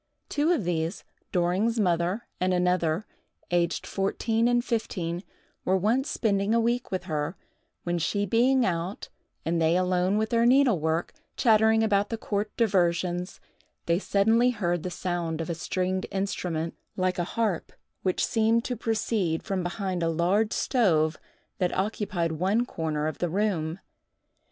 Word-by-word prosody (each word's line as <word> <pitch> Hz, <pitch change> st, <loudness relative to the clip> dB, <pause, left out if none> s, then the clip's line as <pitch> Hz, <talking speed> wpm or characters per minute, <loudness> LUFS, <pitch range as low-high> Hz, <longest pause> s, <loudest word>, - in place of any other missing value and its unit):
Two 300 Hz, +4 st, +1 dB
of 325 Hz, -, +1 dB
these 170 Hz, +1 st, -2 dB, 0.3 s
(Doring's 190 Hz, +6 st, +1 dB
mother 180 Hz, +3 st, +1 dB
and 185 Hz, 0 st, +2 dB
another), 180 Hz, 0 st, +1 dB, 0.5 s
aged 175 Hz, -1 st, +1 dB
fourteen 225 Hz, +4 st, 0 dB
and 240 Hz, 0 st, +2 dB
fifteen, 180 Hz, -7 st, -2 dB, 0.4 s
were 190 Hz, +1 st, +2 dB
once 230 Hz, +9 st, +1 dB
spending 205 Hz, 0 st, +1 dB
a -, -, +4 dB
week 240 Hz, +2 st, 0 dB
with 185 Hz, -2 st, -2 dB
her, 155 Hz, -1 st, -2 dB, 0.5 s
when 175 Hz, 0 st, -1 dB
she 200 Hz, +6 st, 0 dB
being 245 Hz, +5 st, +3 dB
out 175 Hz, +2 st, -3 dB, 0.4 s
and 165 Hz, 0 st, 0 dB
they 165 Hz, +2 st, +3 dB
alone 185 Hz, +2 st, +1 dB
with 220 Hz, 0 st, 0 dB
their 235 Hz, 0 st, +4 dB
needlework, 185 Hz, -, +3 dB, 0.2 s
chattering 220 Hz, -1 st, +4 dB
about 205 Hz, -2 st, +2 dB
the 225 Hz, -, -2 dB
court 210 Hz, -1 st, -2 dB
diversions, 180 Hz, -4 st, +1 dB, 0.5 s
they 170 Hz, +1 st, +2 dB
suddenly 225 Hz, +5 st, +3 dB
heard 175 Hz, -8 st, -1 dB
the 180 Hz, -, -4 dB
sound 175 Hz, -2 st, -3 dB
of 165 Hz, +1 st, -3 dB
a -, -, 0 dB
stringed 185 Hz, +3 st, -2 dB
instrument, 180 Hz, -4 st, -2 dB, 0.2 s
like 185 Hz, -1 st, 0 dB
a -, -, +2 dB
harp, 220 Hz, -7 st, 0 dB, 0.3 s
which 185 Hz, -1 st, +1 dB
seemed 225 Hz, +1 st, +2 dB
to 250 Hz, -, -2 dB
proceed 215 Hz, -7 st, -1 dB
from 195 Hz, -3 st, -2 dB
behind 180 Hz, 0 st, -3 dB
a 165 Hz, -, +1 dB
large 180 Hz, +7 st, +1 dB
stove 165 Hz, -, +2 dB, 0.4 s
that 180 Hz, -1 st, 0 dB
occupied 190 Hz, -4 st, -1 dB
one 190 Hz, +9 st, +1 dB
corner 155 Hz, -8 st, -2 dB
of 155 Hz, -, -3 dB
the 175 Hz, -, 0 dB
room. 175 Hz, -4 st, 0 dB
185 Hz, 150 wpm, -27 LUFS, 170-220 Hz, 0.5 s, a